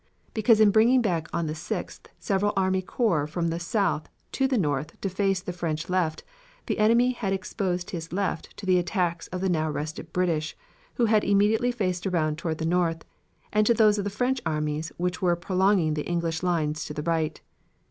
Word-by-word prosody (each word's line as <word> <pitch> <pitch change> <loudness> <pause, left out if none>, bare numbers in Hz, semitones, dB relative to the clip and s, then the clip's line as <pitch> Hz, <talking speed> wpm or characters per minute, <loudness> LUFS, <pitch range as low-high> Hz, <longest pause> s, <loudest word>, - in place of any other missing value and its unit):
Because 220 0 +4
in 215 -2 +6
bringing 235 +4 +5
back 170 -6 0
on 170 -1 -1
the 155 - -2
6th 160 +2 -5
several 205 0 0
army 190 0 +2
corps 180 - 0
from 165 +2 -1
the 165 +1 -2
south 175 -2 -1 0.2
to 270 - +1
the 265 -2 +1
north 150 -5 -1
to 195 - -1
face 195 0 0
the 180 - -5
French 165 -2 -3
left, 175 -4 0 0.4
the - - -2
enemy 235 +4 +4
had 210 -6 -2
exposed 185 -2 -2
his 165 -2 -6
left 185 -3 -3
to 200 - -8
the 185 -1 +4
attacks 175 -2 -1
of 185 0 -5
the 190 - +1
now 160 -3 +1
rested 155 +2 -5
British, 165 -4 -1 0.4
who 240 - +2
had 215 -1 +3
immediately 210 +5 +3
faced 185 -6 -2
around 155 -4 0
toward 165 -2 -2
the 160 - -3
north, 165 -1 0 0.5
and 210 0 +3
to 235 - +4
those 215 -1 +4
of - - -1
the 205 - -2
French 250 +5 -1
armies 155 -1 -2
which 180 +1 -2
were 175 -2 +3
prolonging 185 -2 +2
the 150 -1 -3
English 170 -2 -1
lines 155 -4 0
to 150 - -7
the 150 - -3
right. 160 -1 -1
180 Hz, 200 wpm, -26 LUFS, 160-205 Hz, 0.5 s, in